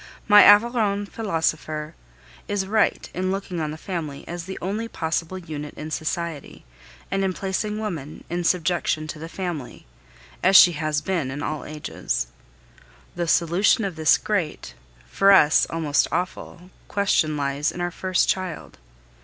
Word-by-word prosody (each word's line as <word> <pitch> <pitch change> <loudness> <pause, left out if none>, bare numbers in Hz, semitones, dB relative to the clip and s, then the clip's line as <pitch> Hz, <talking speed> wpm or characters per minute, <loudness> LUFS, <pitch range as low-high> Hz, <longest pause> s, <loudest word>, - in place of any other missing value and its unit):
My 210 -1 +9
Aveyron 205 -1 +4
philosopher 160 -6 -2 0.5
is 205 -2 -1
right 215 +2 +1
in 185 +1 -1
looking 190 -3 -3
on 155 - -2
the 155 - -6
family 160 -6 -6
as 170 0 -6
the 190 0 -6
only 210 +5 -3
possible 165 -1 -3
unit 150 -4 -7
in 155 +1 -7
society, 160 - -4 0.5
and 195 0 0
in 190 -1 0
placing 200 +3 -3
woman 165 -9 -5
in 175 +1 -3
subjection 170 -2 0
to 155 - -6
the 165 +1 -7
family, 175 -9 -6 0.6
as 190 +1 +4
she 180 - +10
has 155 -1 -1
been 170 -6 -1
in 145 +2 -5
all 155 -1 -4
ages. 150 - -3 0.9
The 175 -1 -2
solution 175 +6 +3
of 190 -4 -4
this 155 -1 +4
great 170 - -3 0.3
for 195 - +4
us 155 -5 +5
almost 155 -3 +1
awful 180 +1 -4 0.2
question 160 -6 +1
lies 140 +1 -1
in - - -9
our 175 0 -1
first 185 +1 0
child. 185 -3 -3
175 Hz, 150 wpm, -23 LUFS, 155-195 Hz, 0.9 s, she